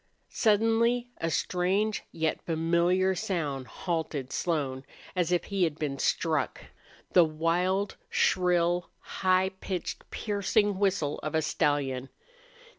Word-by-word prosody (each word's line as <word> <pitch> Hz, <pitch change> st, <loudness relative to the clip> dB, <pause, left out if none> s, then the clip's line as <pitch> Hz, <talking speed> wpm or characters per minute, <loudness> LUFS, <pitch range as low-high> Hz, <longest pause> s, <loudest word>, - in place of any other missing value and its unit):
Suddenly 225 Hz, +3 st, +2 dB
a 165 Hz, -, -1 dB
strange 190 Hz, +6 st, 0 dB
yet 160 Hz, -1 st, -1 dB
familiar 170 Hz, +3 st, +2 dB
sound 160 Hz, -, -2 dB
halted 155 Hz, -2 st, -3 dB
Slone, 140 Hz, -6 st, -1 dB, 0.3 s
as 180 Hz, -2 st, +1 dB
if 175 Hz, -, +2 dB
he 195 Hz, -2 st, -1 dB
had 160 Hz, -3 st, 0 dB
been 140 Hz, -3 st, -3 dB
struck. 155 Hz, -6 st, 0 dB, 0.5 s
The 180 Hz, -, +8 dB
wild, 175 Hz, +5 st, 0 dB
shrill, 175 Hz, -1 st, +2 dB
high 185 Hz, 0 st, +1 dB
pitched, 185 Hz, -3 st, -5 dB
piercing 205 Hz, -1 st, 0 dB
whistle 190 Hz, -7 st, +1 dB
of 155 Hz, +1 st, -4 dB
a 160 Hz, -, +2 dB
stallion! 140 Hz, -4 st, 0 dB
175 Hz, 115 wpm, -28 LUFS, 155-190 Hz, 0.5 s, The